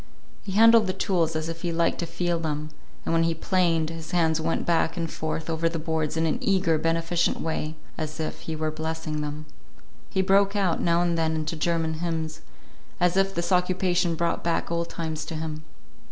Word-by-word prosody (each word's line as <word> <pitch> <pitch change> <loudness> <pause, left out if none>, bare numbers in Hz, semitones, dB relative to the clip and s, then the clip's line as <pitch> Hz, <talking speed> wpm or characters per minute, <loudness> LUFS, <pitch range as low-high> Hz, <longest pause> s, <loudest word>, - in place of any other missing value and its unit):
He 195 - -6
handled 225 0 +7
the 185 - 0
tools 175 -4 0
as 155 0 -1
if 165 0 -5
he 175 - -1
liked 165 0 +1
the 170 - -2
feel 170 +1 -1
of - - -5
them; 155 -1 -3 0.3
and - - 0
when 165 - +4
he 165 0 +1
planed, 165 -2 +1
his 165 -1 -7
hands 160 -2 +2
went 165 +1 -1
back 165 0 +1
and 165 -2 -3
forth 160 0 -3
over 165 0 +1
the 165 - -3
boards 160 -1 -1
in 160 - +2
an 160 - 0
eager, 180 -5 +2
beneficent 165 +1 +1
way 160 -1 -2 0.2
as 155 0 -4
if 155 - -3
he 160 - -5
were 155 0 -1
blessing 160 -1 -3
them. 150 +1 -5 0.6
He 190 - +1
broke 195 +1 +3
out 190 -5 +1
now 170 0 +3
and 170 -1 +1
then 160 0 +1
into 155 +1 -2
German 160 -1 0
hymns, 160 -2 -3 0.6
as 180 0 +3
if 195 0 +2
this 170 +1 -2
occupation 180 -1 +2
brought 170 +1 -1
back 170 0 0
old 170 0 -1
times 160 -2 -4
to 165 - -5
him. 155 0 -4
165 Hz, 205 wpm, -26 LUFS, 160-175 Hz, 0.6 s, handled